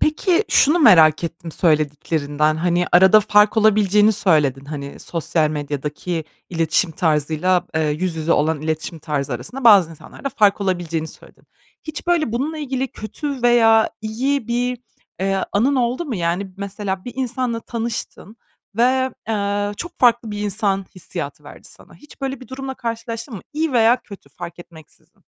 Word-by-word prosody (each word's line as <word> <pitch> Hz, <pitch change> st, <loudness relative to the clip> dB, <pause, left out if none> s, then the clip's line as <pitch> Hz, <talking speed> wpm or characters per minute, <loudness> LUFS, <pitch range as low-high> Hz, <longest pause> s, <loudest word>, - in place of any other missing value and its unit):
Peki, 355 Hz, +5 st, +2 dB
şunu 305 Hz, +5 st, +4 dB
merak 165 Hz, -, +6 dB
ettim 165 Hz, 0 st, -6 dB
söylediklerinden, 150 Hz, -1 st, 0 dB
hani, 175 Hz, +2 st, +1 dB
arada 190 Hz, +4 st, +7 dB
fark 210 Hz, +1 st, +3 dB
olabileceğini 210 Hz, 0 st, +4 dB
söyledin; 150 Hz, -9 st, +2 dB
hani, 140 Hz, -1 st, -7 dB
sosyal 165 Hz, -2 st, -1 dB
medyadaki 150 Hz, +3 st, -4 dB, 0.3 s
iletişim 165 Hz, 0 st, +1 dB
tarzıyla, 160 Hz, +3 st, 0 dB
eee, 160 Hz, -1 st, +1 dB
yüz 165 Hz, +3 st, -2 dB
yüze 160 Hz, +1 st, 0 dB
olan 155 Hz, 0 st, +1 dB
iletişim 160 Hz, +1 st, -3 dB
tarzı 145 Hz, -2 st, -3 dB
arasında 270 Hz, 0 st, -6 dB
bazı 200 Hz, -7 st, +7 dB
insanlarda 165 Hz, -, -8 dB
fark 210 Hz, -5 st, +2 dB
olabileceğini 170 Hz, -4 st, -2 dB
söyledin. -, -, -14 dB, 0.4 s
Hiç, 310 Hz, +1 st, -7 dB
böyle, 335 Hz, -9 st, +1 dB
bununla 290 Hz, +7 st, -2 dB
ilgili 265 Hz, -2 st, -2 dB
kötü 270 Hz, +5 st, -6 dB
veya 225 Hz, -2 st, +5 dB
iyi 235 Hz, +4 st, -2 dB
bir, 245 Hz, +1 st, -1 dB, 0.4 s
eee, 195 Hz, 0 st, 0 dB
anın 255 Hz, +8 st, +2 dB
oldu 250 Hz, +6 st, 0 dB
mu? 275 Hz, -7 st, -4 dB
Yani, 180 Hz, +2 st, -2 dB
mesela, 195 Hz, -1 st, -4 dB
bir 245 Hz, -, -7 dB
insanla 250 Hz, -2 st, -2 dB
tanıştın 230 Hz, -2 st, -6 dB, 0.4 s
ve, 260 Hz, +2 st, +2 dB, 0.2 s
eee, 205 Hz, -1 st, -1 dB
çok 345 Hz, -, -8 dB
farklı 240 Hz, -2 st, +3 dB
bir 205 Hz, -, -5 dB
insan 200 Hz, -2 st, -1 dB
hissiyatı 185 Hz, -, -7 dB
verdi -, -, -13 dB
sana. -, -, -14 dB
Hiç 295 Hz, -, -17 dB
böyle 270 Hz, -1 st, -4 dB
bir 255 Hz, -, -13 dB
durumla 265 Hz, 0 st, -6 dB
karşılaştın 230 Hz, +1 st, -5 dB
mı? 195 Hz, -, -7 dB
İyi 310 Hz, -1 st, -1 dB
veya 235 Hz, +1 st, +4 dB
kötü, 200 Hz, -4 st, -13 dB
fark 175 Hz, -1 st, -9 dB
etmeksizin. 165 Hz, -3 st, -17 dB
205 Hz, 150 wpm, -20 LUFS, 165-245 Hz, 0.4 s, arada